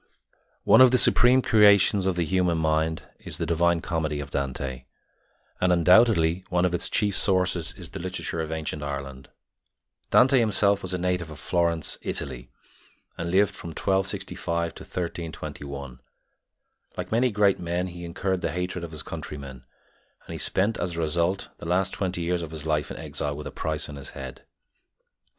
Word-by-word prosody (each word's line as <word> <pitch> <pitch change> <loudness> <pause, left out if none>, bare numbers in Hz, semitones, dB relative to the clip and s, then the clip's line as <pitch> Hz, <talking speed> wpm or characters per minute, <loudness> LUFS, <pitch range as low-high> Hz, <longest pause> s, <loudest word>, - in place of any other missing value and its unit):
One - - +6
of 130 - +9
the 125 - +3
supreme 125 +1 +5
creations 100 -2 +5
of 95 - +1
the 85 -1 0
human 90 -1 +1
mind 80 0 0 0.2
is - - -6
the - - -2
Divine 85 0 +2
Comedy 80 -4 -2
of 70 -1 -7
Dante, 65 -1 -3 0.7
and 90 0 +3
undoubtedly 90 -1 +4
one 90 0 +2
of 90 - 0
its 85 - -1
chief 105 -3 +1
sources 90 -4 +1
is - - -10
the - - -6
literature 90 -2 -4
of 80 0 -4
ancient 80 -1 -3
Ireland. 70 -2 -6 0.8
Dante 130 0 +5
himself 100 -3 +2
was 95 -1 -3
a - - -1
native 90 -2 -1
of 75 - -9
Florence, 85 +1 -1
Italy, 65 -2 -4 0.7
and 85 0 -4
lived 100 +3 +3
from - - -9
1265 85 -2 -1
to - - -12
1321. 70 -6 -6 1.0
Like - - -5
many 120 +3 +3
great 105 -3 +2
men, 85 +1 -2
he 85 -1 -8
incurred 90 +2 -2
the - - -1
hatred 90 0 -3
of 85 - -5
his 80 0 -7
countrymen, 70 -5 -8 0.6
and - - -8
he - - -5
spent, 105 +4 +1
as 90 -2 -2
a - - -2
result, 85 +4 0
the - - -7
last 90 +2 +1
twenty 90 -3 -2
years 85 +1 0
of 80 - -5
his 80 -1 -7
life 75 -2 0
in - - -7
exile 70 0 -4
with 75 - -7
a - - -5
price 80 0 -3
on 75 -1 -8
his 70 - -8
head. 65 -2 -9
85 Hz, 175 wpm, -26 LUFS, 80-95 Hz, 1.0 s, of